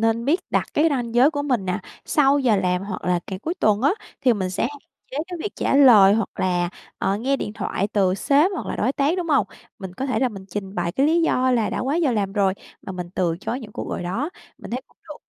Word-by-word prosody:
nên 225 Hz, +1 st, +1 dB
biết 315 Hz, +7 st, +2 dB
đặt -, -, +1 dB
cái 310 Hz, +3 st, +4 dB
ranh 240 Hz, -4 st, -2 dB
giới 255 Hz, +5 st, +6 dB
của 290 Hz, -2 st, -3 dB
mình 250 Hz, -8 st, 0 dB
nè, 180 Hz, -, -1 dB, 0.3 s
sau 285 Hz, -1 st, +3 dB
giờ 245 Hz, -6 st, +3 dB
làm 180 Hz, -1 st, 0 dB
hoặc 195 Hz, -2 st, -6 dB
là 175 Hz, -1 st, +1 dB
cả 190 Hz, -, -5 dB
cuối 335 Hz, -, -2 dB
tuần 215 Hz, -, +1 dB
á, 285 Hz, -, +4 dB, 0.3 s
thì 250 Hz, -, +4 dB
mình 190 Hz, -4 st, -2 dB
sẽ 180 Hz, -, -2 dB
hạn 290 Hz, -, -10 dB, 0.3 s
chế 265 Hz, -, -7 dB
cái 355 Hz, -1 st, -6 dB
việc 415 Hz, -, -4 dB
trả -, -, 0 dB
lời 215 Hz, -8 st, +8 dB
hoặc 225 Hz, -2 st, 0 dB
là, 175 Hz, -1 st, +1 dB, 0.3 s
ờ, 195 Hz, -, 0 dB
nghe 265 Hz, +6 st, 0 dB
điện 210 Hz, -, -4 dB
thoại 205 Hz, -2 st, -2 dB
từ 190 Hz, -3 st, +2 dB
sếp 285 Hz, -, +3 dB
hoặc 345 Hz, -, -5 dB
là -, -, -3 dB
đối 250 Hz, +5 st, +1 dB
tác, 285 Hz, +5 st, +1 dB
đúng 350 Hz, -2 st, -3 dB
hông? 285 Hz, -3 st, +3 dB, 0.3 s
Mình 190 Hz, -2 st, -8 dB
có 265 Hz, -, -3 dB
thể 250 Hz, -5 st, 0 dB
là 255 Hz, -, +2 dB
mình 195 Hz, -4 st, -10 dB
trình 195 Hz, +1 st, -5 dB
bày 175 Hz, -1 st, -1 dB
cái 275 Hz, +8 st, +2 dB
lý 330 Hz, +2 st, +3 dB
do 255 Hz, -5 st, +2 dB
là 235 Hz, -4 st, +1 dB
đã -, -, -3 dB
quá 275 Hz, +5 st, 0 dB
giờ 305 Hz, -8 st, +2 dB
làm 200 Hz, -3 st, -1 dB
rồi 195 Hz, -2 st, +2 dB, 0.3 s
mà 190 Hz, -, -7 dB
mình 180 Hz, -1 st, -6 dB
từ 170 Hz, -3 st, 0 dB
chối 250 Hz, +5 st, -3 dB
những 210 Hz, -3 st, -10 dB
cuộc -, -, -5 dB
gọi -, -, -3 dB
đó. 230 Hz, -, -2 dB, 0.3 s
Mình -, -, -10 dB
thấy 250 Hz, -, -2 dB
cũng -, -, -31 dB
được. 300 Hz, -, -7 dB
230 Hz, 270 wpm, -23 LUFS, 195-275 Hz, 0.3 s, lời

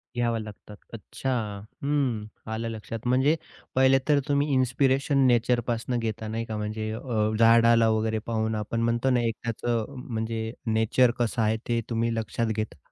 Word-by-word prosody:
घ्याव्या 120 Hz, -1 st, 0 dB
लागतात. 105 Hz, 0 st, -10 dB, 0.2 s
अच्छा! 115 Hz, +4 st, -5 dB, 0.5 s
हं 135 Hz, -7 st, 0 dB, 0.3 s
आलं 115 Hz, +1 st, -3 dB
लक्षात 115 Hz, +1 st, -6 dB
म्हणजे 130 Hz, +5 st, +3 dB, 0.4 s
पहिले 130 Hz, +1 st, +5 dB
तर 145 Hz, -1 st, +5 dB
तुम्ही 145 Hz, 0 st, +2 dB
इन्स्पिरेशन 135 Hz, +2 st, +2 dB
नेचर 120 Hz, 0 st, +3 dB
पासून 120 Hz, +1 st, -1 dB
घेता 110 Hz, -1 st, -3 dB
नाही 115 Hz, +1 st, -3 dB
का? 110 Hz, -1 st, -5 dB
म्हणजे 110 Hz, +1 st, -3 dB
अ, 110 Hz, -2 st, -1 dB
झाडाला 115 Hz, 0 st, +6 dB
वगैरे 110 Hz, 0 st, 0 dB
पाहून 110 Hz, -1 st, -1 dB
आपण 110 Hz, +2 st, -2 dB
म्हणतो 115 Hz, +3 st, +1 dB
ना 125 Hz, -2 st, +3 dB
एक 115 Hz, -, 0 dB
त्याचं 115 Hz, -1 st, -1 dB, 0.2 s
म्हणजे 110 Hz, -1 st, -3 dB, 0.2 s
नेचर 110 Hz, +3 st, +3 dB
कसं 120 Hz, 0 st, 0 dB
आहे 110 Hz, 0 st, +2 dB
ते 120 Hz, -1 st, +1 dB
तुम्ही 115 Hz, 0 st, 0 dB
लक्षात 115 Hz, +1 st, -2 dB
घेता. 110 Hz, -6 st, -4 dB
115 Hz, 160 wpm, -26 LUFS, 110-125 Hz, 0.5 s, झाडाला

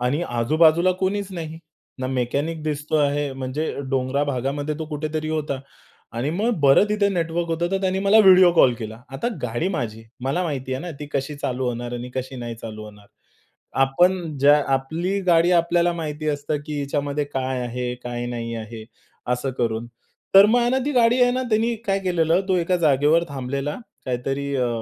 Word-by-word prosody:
आणि 130 Hz, +7 st, 0 dB
आजूबाजूला 155 Hz, +9 st, +3 dB
कुणीच 200 Hz, +1 st, 0 dB
नाही. 160 Hz, -2 st, -6 dB, 0.4 s
ना 130 Hz, -, -2 dB
मेकॅनिक 140 Hz, +5 st, -2 dB
दिसतो 150 Hz, 0 st, -2 dB
आहे, 145 Hz, -1 st, +1 dB
म्हणजे 135 Hz, +4 st, -3 dB, 0.2 s
डोंगराळ 135 Hz, +1 st, 0 dB
भागामध्ये 140 Hz, +2 st, -2 dB
तो 160 Hz, -, -3 dB
कुठेतरी 155 Hz, +1 st, -3 dB
होता 150 Hz, -4 st, -2 dB, 0.5 s
आणि 120 Hz, +5 st, -2 dB
मग 205 Hz, +8 st, 0 dB
बरं 140 Hz, +6 st, +6 dB
तिथे 210 Hz, -1 st, +2 dB
नेटवर्क 170 Hz, -2 st, -1 dB
होतं 170 Hz, +1 st, -1 dB
तर 195 Hz, 0 st, 0 dB
त्याने 190 Hz, -1 st, 0 dB
मला 200 Hz, +3 st, +4 dB
व्हिडिओ 185 Hz, -2 st, +7 dB
कॉल 130 Hz, -7 st, +5 dB
केला. 110 Hz, 0 st, -7 dB
आता 135 Hz, -, -2 dB
गाडी 120 Hz, +9 st, -1 dB
माझी. 115 Hz, -, -4 dB, 0.2 s
मला 140 Hz, +7 st, 0 dB
माहिती 135 Hz, -5 st, -3 dB
आहे 130 Hz, -, -2 dB
ना 175 Hz, -, -5 dB
ती 150 Hz, -, -5 dB
कशी 140 Hz, +2 st, -2 dB
चालू 130 Hz, -2 st, -2 dB
होणार 120 Hz, 0 st, -3 dB
आणि 120 Hz, +1 st, -6 dB
कशी 130 Hz, +1 st, -4 dB
नाही 120 Hz, -1 st, -5 dB
चालू 110 Hz, -1 st, -8 dB
होणार. 105 Hz, -1 st, -14 dB, 0.8 s
आपण 170 Hz, +3 st, +2 dB
ज्या 145 Hz, +2 st, +6 dB, 0.2 s
आपली 165 Hz, +9 st, -2 dB
गाडी 170 Hz, 0 st, +4 dB
आपल्याला 170 Hz, 0 st, +3 dB
माहिती 155 Hz, -2 st, -4 dB
असतं 145 Hz, +1 st, -1 dB
की 150 Hz, -1 st, -4 dB
हिच्यामध्ये 145 Hz, +1 st, -2 dB
काय 130 Hz, -2 st, -3 dB
आहे, 125 Hz, +1 st, -3 dB
काय 120 Hz, 0 st, -4 dB
नाही 115 Hz, -1 st, -4 dB
आहे. 110 Hz, 0 st, -8 dB, 0.5 s
असं 125 Hz, +2 st, -1 dB
करून. 115 Hz, -1 st, -1 dB, 0.5 s
तर 195 Hz, +1 st, +10 dB
मग 230 Hz, +3 st, +3 dB
आहे 240 Hz, 0 st, +2 dB
ना 260 Hz, -, +2 dB
ती 295 Hz, -, -1 dB
गाडी 240 Hz, -1 st, +4 dB
आहे 245 Hz, -, +5 dB
ना 255 Hz, +1 st, -1 dB
त्यांनी 225 Hz, +2 st, +2 dB
काय 195 Hz, -1 st, +2 dB
केलेलं 175 Hz, -2 st, +2 dB
तो 185 Hz, -, +3 dB
एका 180 Hz, +1 st, +1 dB
जागेवर 155 Hz, +1 st, +3 dB
थांबलेला 140 Hz, +1 st, -3 dB, 0.3 s
काहीतरी 135 Hz, +3 st, -2 dB
अ, 125 Hz, -2 st, +1 dB
145 Hz, 180 wpm, -23 LUFS, 130-175 Hz, 0.8 s, तर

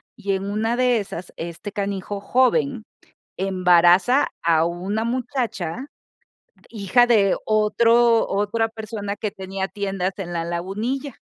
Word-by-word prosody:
y 205 Hz, -4 st, -3 dB
en 190 Hz, 0 st, -2 dB
una 225 Hz, +3 st, -1 dB
de 250 Hz, -2 st, +3 dB
esas 185 Hz, -3 st, -7 dB
este 170 Hz, +5 st, -6 dB
canijo 200 Hz, 0 st, -4 dB
joven 255 Hz, +2 st, +1 dB, 0.5 s
embaraza 185 Hz, +6 st, +4 dB
a 165 Hz, -1 st, +3 dB
una 185 Hz, +6 st, -2 dB
muchacha, 245 Hz, -, -3 dB, 0.8 s
hija 215 Hz, +2 st, +3 dB
de 205 Hz, -5 st, +4 dB
otro 230 Hz, +2 st, +3 dB
otra 210 Hz, +3 st, 0 dB
persona 215 Hz, -2 st, -5 dB
que 210 Hz, 0 st, -2 dB
tenía 190 Hz, 0 st, -5 dB
tiendas 195 Hz, -2 st, -3 dB
en 175 Hz, -2 st, -5 dB
la 165 Hz, -1 st, -2 dB
Lagunilla 210 Hz, -, -3 dB
205 Hz, 120 wpm, -22 LUFS, 190-230 Hz, 0.8 s, embaraza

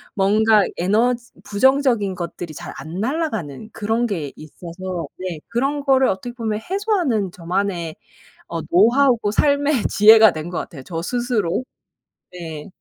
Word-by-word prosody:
뭔가 210 Hz, +1 st, +4 dB
에너지 235 Hz, +6 st, +1 dB
부정적인 235 Hz, -3 st, +2 dB
것들이 170 Hz, -2 st, -6 dB
잘 -, -, -8 dB
안 165 Hz, +4 st, -7 dB
날아가는 220 Hz, -, -3 dB
그런 225 Hz, +2 st, 0 dB
게 160 Hz, -, -4 dB
있어서 175 Hz, +3 st, -7 dB
네 180 Hz, -4 st, -5 dB
그런 275 Hz, +5 st, -1 dB
거를 265 Hz, -2 st, +4 dB
어떻게 215 Hz, +6 st, -4 dB
보면 220 Hz, -3 st, -2 dB
해소하는 360 Hz, -, 0 dB
저만의 175 Hz, -2 st, -3 dB, 0.5 s
어 165 Hz, -, -4 dB
노하우고 235 Hz, +3 st, +3 dB
삶의 285 Hz, -1 st, +2 dB
지혜가 220 Hz, +1 st, +7 dB
된 155 Hz, +2 st, -6 dB
것 175 Hz, -, -3 dB
같아요 140 Hz, -5 st, -8 dB
저 165 Hz, -2 st, -5 dB
스스로. 240 Hz, -2 st, -1 dB, 0.7 s
네. 160 Hz, -4 st, -7 dB
210 Hz, 285 characters per minute, -21 LUFS, 175-245 Hz, 0.7 s, 지혜가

